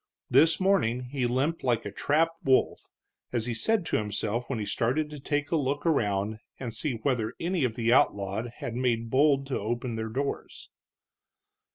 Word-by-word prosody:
This 165 +1 +5
morning 180 - +2
he 125 0 -2
limped 140 +7 0
like 120 -3 +1
a 100 - -4
trapped 165 +9 0
wolf, 130 -1 +2 0.4
as 120 -3 -1
he 120 - -2
said 205 - +1
to - - +1
himself 105 +3 -2
when 135 - -1
he 105 - -3
started 140 +9 0
to 150 - -7
take 145 +1 -2
a - - +3
look 145 0 -1
around 110 -8 +1 0.2
and 120 -4 -5
see 150 +1 -1
whether 115 -2 -1
any 175 -2 0
of 115 -3 -2
the 120 0 +2
outlawed 100 -1 +2
had 115 - -5
made 115 -2 0
bold 140 0 +4
to 135 - -2
open 120 +2 -3
their 110 0 -3
doors. 140 +5 -4
125 Hz, 180 wpm, -28 LUFS, 115-145 Hz, 0.4 s, This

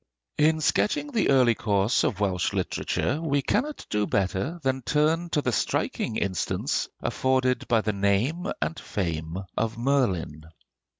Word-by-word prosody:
In 155 +1 +3
sketching 290 - +1
the 230 -6 +1
early 125 -3 +5
course 105 +1 +1
of 105 - 0
Welsh 95 -4 0
literature, 150 +4 -1
we 145 -4 0
cannot 285 - -1
do 105 -1 +1
better 100 - -1
than 130 0 0
turn 155 +6 +1
to 150 -3 0
the 125 - +1
striking 110 - -1
instance 95 -4 -1
afforded 130 -1 +1
by 115 -2 +3
the 105 0 -1
name 100 - 0
and 165 - -4
fame 80 -3 -3 0.2
of 115 0 -1
Merlin. 100 - 0
125 Hz, 140 wpm, -26 LUFS, 100-150 Hz, 0.2 s, early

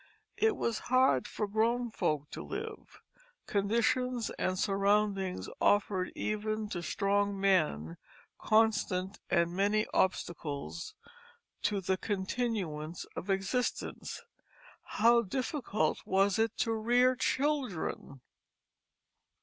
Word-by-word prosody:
It 440 -1 +3
was 230 -2 -1
hard 255 - +4
for 210 - -3
grown 230 +3 +1
folk 150 -7 -1
to - - -6
live; 440 +2 -7 0.4
conditions 235 +4 +1
and 185 0 -1
surroundings 195 -1 +1
offered 195 -2 +2
even 215 0 -2
to 175 - -3
strong 200 +2 0
men 155 - +1 0.4
constant 210 -3 +2
and 170 -1 +2
many 205 +3 +2
obstacles 165 -4 -2 0.7
to 205 -2 0
the 190 0 0
continuance 190 -6 -3
of 195 - -6
existence; 195 - -2 0.6
how 235 +2 +4
difficult 235 - -1
was 195 +2 +2
it 225 0 +1
then - - +2
to 225 - 0
rear 245 +3 +3
children! 255 - -1
205 Hz, 100 wpm, -31 LUFS, 185-230 Hz, 0.7 s, hard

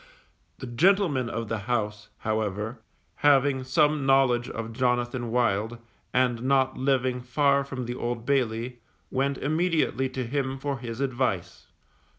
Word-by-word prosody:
The - - -7
gentleman 145 - +2
of 115 0 -3
the 110 0 -2
house, 105 -3 -1
however, 110 +1 -2 0.4
having 140 -2 +3
some 150 +2 +2
knowledge 135 -3 +3
of 115 0 -5
Jonathan 120 0 0
Wild, 115 -1 +1 0.3
and 125 -2 +1
not 130 0 +2
living 130 -2 +1
far 140 +3 +2
from 130 -2 -5
the 120 - -3
Old 120 -1 -3
Bailey, 125 -2 0 0.3
went 140 +1 0
immediately 155 -3 +1
to 130 -1 -4
him 135 +1 -2
for 140 -1 -3
his 120 0 -6
advice. 125 -9 -2
130 Hz, 135 wpm, -27 LUFS, 120-135 Hz, 0.4 s, having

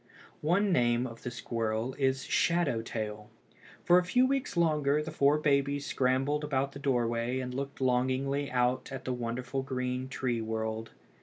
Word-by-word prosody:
One 190 +6 +2
name 120 -5 +2
of 115 -2 -8
the - - -4
squirrel 115 0 -2
is 135 -1 +1
"shadow 150 -4 +1
tail." 105 -2 -5 0.5
For 175 +1 +6
a - - -1
few 250 +8 +3
weeks 270 -7 -1
longer 150 -3 +2
the 160 - -6
four 145 -1 +3
babies 140 -1 +1
scrambled 135 +4 +1
about 140 -2 0
the 140 - -9
doorway 120 -2 0
and 125 -1 -4
looked 140 +1 -5
longingly 130 +2 +1
out 125 +1 0
at 135 -1 -6
the 130 - -1
wonderful 125 +2 -3
green 130 0 -3
tree 125 -3 -1
world. 110 0 -3
130 Hz, 160 wpm, -30 LUFS, 120-145 Hz, 0.5 s, For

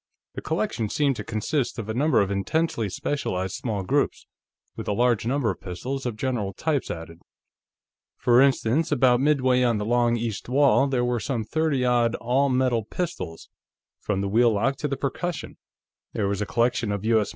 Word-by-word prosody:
The - - -6
collection 160 - -2
seemed 140 +1 +1
to - - -4
consist 120 +5 -2
of 115 -3 -5
a 110 - -2
number 145 +4 +3
of 100 0 -1
intensely 110 - -1
specialized 95 -4 -2
small 105 -5 -3
groups, 95 - 0 0.5
with - - -7
a 105 - +1
large 120 0 +1
number 130 -4 +1
of - - -9
pistols 125 +9 -4
of 120 - -3
general 110 -4 -2
types 150 +6 -1
added. 80 0 -7 1.0
For 120 +1 +4
instance, 135 +3 +2
about 125 -3 +4
midway 130 -3 +3
on 120 -3 +2
the 105 - -3
long 120 +1 +2
east 115 -1 -4
wall, 140 +1 +4
there 125 -3 0
were 120 -1 0
some 115 0 -2
thirty 145 0 0
odd 120 -1 +2
all 130 +4 +1
metal 125 -3 +1
pistols, 110 - -5 0.5
from 100 -2 -2
wheel 115 +4 +3
lock 110 +6 +1
to 150 - -3
percussion. 140 +6 -3 0.6
There 100 - 0
was 100 +1 -2
a 105 - -2
collection 120 -1 +1
of 100 +1 -3
U.S. 110 -3 +2
120 Hz, 175 wpm, -25 LUFS, 105-135 Hz, 1.0 s, For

